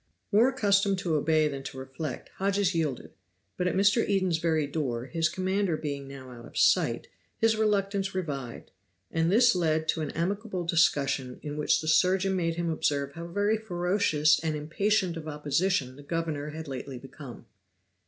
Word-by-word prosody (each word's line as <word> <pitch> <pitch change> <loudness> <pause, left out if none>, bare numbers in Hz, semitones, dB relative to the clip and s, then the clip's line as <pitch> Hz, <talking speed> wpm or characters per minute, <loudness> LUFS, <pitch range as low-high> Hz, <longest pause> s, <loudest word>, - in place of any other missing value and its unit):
More 225 +5 +5
accustomed 200 -6 +2
to 180 -3 -2
obey 155 +1 +3
than 140 -2 -4
to 135 - -8
reflect, 130 +1 -6
Hodges 195 -1 +1
yielded, 155 -6 -2 0.4
but 180 - -1
at - - 0
Mr. 200 +4 +4
Eden's 185 -5 +1
very 160 -3 +1
door, 135 -5 -3
his 165 +3 0
commander 185 -1 0
being 140 -3 -5
now 135 -2 -10
out 120 -1 -11
of - - -11
sight, - - +3 0.3
his 225 0 +3
reluctance 200 -2 0
revived; 140 -9 -5 0.4
and 165 +1 +1
this 235 +3 +5
led 160 -3 0
to 160 - +1
an 150 - -2
amicable 190 +2 -2
discussion 140 -6 +1
in 145 -1 -5
which 150 0 +2
the 155 - -6
surgeon 190 +4 +3
made 165 -2 0
him 170 -1 -1
observe 140 -3 0
how 170 +3 -7
very 205 +5 +1
ferocious 175 -6 +2
and 160 -1 -1
impatient 180 +4 0
of 160 -1 -7
opposition 150 -1 0
the 145 - -12
governor 150 -1 -3
had 160 +1 -7
lately 135 0 -6
become. 135 0 -11
165 Hz, 170 wpm, -28 LUFS, 145-195 Hz, 0.4 s, More